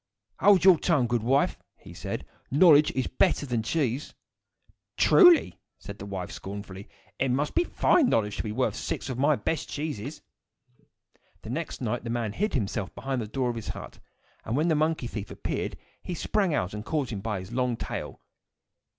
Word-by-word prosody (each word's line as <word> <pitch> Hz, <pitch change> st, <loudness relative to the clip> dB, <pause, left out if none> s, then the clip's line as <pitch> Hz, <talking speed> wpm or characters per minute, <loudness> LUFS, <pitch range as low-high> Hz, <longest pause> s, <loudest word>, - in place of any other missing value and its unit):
"Hold 200 Hz, -4 st, +5 dB
your 185 Hz, -4 st, +7 dB
tongue, 150 Hz, -8 st, +2 dB
good 120 Hz, -1 st, 0 dB
wife!" 135 Hz, +5 st, +1 dB, 0.2 s
he -, -, -13 dB
said. -, -, -5 dB, 0.2 s
"Knowledge 150 Hz, 0 st, +6 dB
is 130 Hz, -, -1 dB
better 175 Hz, -5 st, +1 dB
than 120 Hz, -4 st, -1 dB
cheese." 135 Hz, +2 st, -2 dB, 0.8 s
"Truly!" 355 Hz, -5 st, +6 dB, 0.2 s
said 100 Hz, -1 st, -10 dB
the 100 Hz, -, -7 dB
wife, 95 Hz, -3 st, -5 dB
scornfully. 100 Hz, 0 st, -8 dB, 0.3 s
"It 135 Hz, -, +1 dB
must 140 Hz, +4 st, 0 dB
be 350 Hz, -, +2 dB
a -, -, -11 dB
fine 310 Hz, -8 st, +3 dB
knowledge 105 Hz, -2 st, 0 dB
to -, -, -1 dB
be 110 Hz, -, -4 dB
worth 125 Hz, +4 st, 0 dB
six -, -, -4 dB
of 125 Hz, -1 st, -4 dB
my 145 Hz, +2 st, +4 dB
best 145 Hz, +7 st, -3 dB
cheeses." 145 Hz, -2 st, -5 dB, 1.2 s
The -, -, -6 dB
next -, -, -4 dB
night -, -, -2 dB
the 115 Hz, -, -5 dB
man 115 Hz, -3 st, -2 dB
hid 210 Hz, -, -1 dB
himself 105 Hz, -4 st, -2 dB
behind 135 Hz, -2 st, -3 dB
the 110 Hz, -, -5 dB
door 125 Hz, +3 st, -1 dB
of 115 Hz, -2 st, -6 dB
the -, -, -4 dB
hut, -, -, -10 dB, 0.4 s
and 115 Hz, +4 st, -2 dB
when 160 Hz, +3 st, +2 dB
the 160 Hz, -, +3 dB
monkey 155 Hz, -3 st, 0 dB
thief 110 Hz, -4 st, -5 dB
appeared, -, -, -4 dB, 0.2 s
he 180 Hz, -, -5 dB
sprang 195 Hz, +1 st, 0 dB
out 100 Hz, -11 st, -1 dB
and 105 Hz, 0 st, -5 dB
caught 145 Hz, -1 st, -2 dB
him 100 Hz, -3 st, -4 dB
by 105 Hz, -2 st, -2 dB
his 95 Hz, +4 st, -9 dB
long 125 Hz, -1 st, 0 dB
tail. -, -, -5 dB
125 Hz, 190 wpm, -27 LUFS, 110-155 Hz, 1.2 s, your